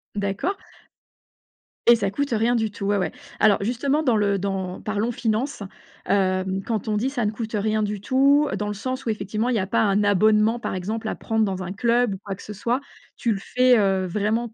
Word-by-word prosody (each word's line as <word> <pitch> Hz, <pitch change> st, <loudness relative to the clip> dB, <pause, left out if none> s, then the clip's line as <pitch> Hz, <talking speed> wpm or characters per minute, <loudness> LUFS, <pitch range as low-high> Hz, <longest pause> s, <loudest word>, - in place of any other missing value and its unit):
D'accord. 200 Hz, -, -2 dB, 1.3 s
Et 235 Hz, -, +9 dB
ça 200 Hz, -3 st, -1 dB
coûte 285 Hz, +4 st, -2 dB
rien 230 Hz, +2 st, +2 dB
du 220 Hz, -2 st, 0 dB
tout, 200 Hz, -1 st, -6 dB
ouais, 205 Hz, 0 st, +2 dB
ouais. 180 Hz, -4 st, -1 dB, 0.3 s
Alors 210 Hz, -2 st, +5 dB
justement, 275 Hz, +7 st, 0 dB
dans 240 Hz, -6 st, +3 dB
le 200 Hz, -1 st, +2 dB
dans 190 Hz, -1 st, -3 dB
parlons 215 Hz, +2 st, -1 dB
finance. 230 Hz, +1 st, -2 dB, 0.4 s
Hem 190 Hz, -1 st, +1 dB
quand 220 Hz, -1 st, -3 dB
on 210 Hz, -, +1 dB
dit: 250 Hz, +6 st, 0 dB
«Ça 245 Hz, -5 st, -2 dB
ne 210 Hz, -, +1 dB
coûte 220 Hz, 0 st, -5 dB
rien 215 Hz, +1 st, 0 dB
du 210 Hz, -1 st, -2 dB
tout», 280 Hz, +5 st, +4 dB
dans 210 Hz, -, -2 dB
le 210 Hz, -, -2 dB
sens 255 Hz, +6 st, -4 dB
où, 230 Hz, -, -1 dB
effectivement, 215 Hz, +3 st, -2 dB
il 250 Hz, -, +1 dB
y 190 Hz, -, 0 dB
pas 195 Hz, -, +1 dB
un 205 Hz, -1 st, +2 dB
abonnement, 215 Hz, +3 st, +4 dB
par -, -, -4 dB
exemple 215 Hz, +5 st, -3 dB
à -, -, -3 dB
prendre 225 Hz, -1 st, 0 dB
dans 190 Hz, -1 st, -3 dB
un 185 Hz, +1 st, -5 dB
club 235 Hz, +1 st, +2 dB
ou -, -, -8 dB
quoi 200 Hz, -, -4 dB
que -, -, -13 dB
ce 210 Hz, -, -7 dB
soit, 235 Hz, +5 st, -1 dB, 0.4 s
tu 235 Hz, -, 0 dB
le 195 Hz, -, -4 dB
fais, 250 Hz, +2 st, +3 dB
heu, 195 Hz, -2 st, +2 dB
vraiment 215 Hz, +5 st, -1 dB
215 Hz, 220 wpm, -23 LUFS, 200-240 Hz, 1.3 s, Et